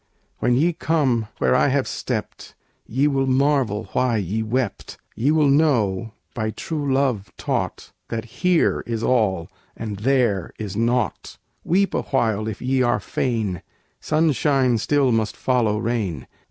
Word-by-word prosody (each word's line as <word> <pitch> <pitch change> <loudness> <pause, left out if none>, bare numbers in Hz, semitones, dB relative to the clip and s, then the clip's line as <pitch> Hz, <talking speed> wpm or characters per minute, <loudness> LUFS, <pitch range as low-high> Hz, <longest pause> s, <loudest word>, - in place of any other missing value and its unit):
When 125 - +2
ye 165 +7 +2
come 135 -9 +1
where - - +2
I 130 - +4
have 140 0 +1
stepped, 110 -5 -5 0.3
Ye 135 +6 +1
will 135 -2 +1
marvel 130 -5 +2
why 125 -3 +2
ye 105 +2 -2
wept; 115 0 -2 0.2
Ye 125 +6 +1
will 155 -1 +4
know, 115 -9 +2 0.2
by 110 -2 -2
true 145 +6 -3
love 130 -7 0
taught, - - -3 0.2
That 115 0 -3 0.2
here 180 -2 +3
is 115 -1 -2
all, 105 -9 +1 0.3
and 110 -3 -5
there 115 -5 +1
is 105 -2 -5
naught. 115 -1 -1 0.3
Weep 195 +4 +2
awhile, 110 -5 0
if 110 0 -5
ye 130 +1 +1
are 120 -1 +2
fain, 110 -8 -2 0.4
Sunshine 145 -5 +2
still 140 +3 +2
must 110 -2 0
follow 120 -5 +1
rain! 105 - -2
120 Hz, 140 wpm, -22 LUFS, 110-135 Hz, 0.4 s, I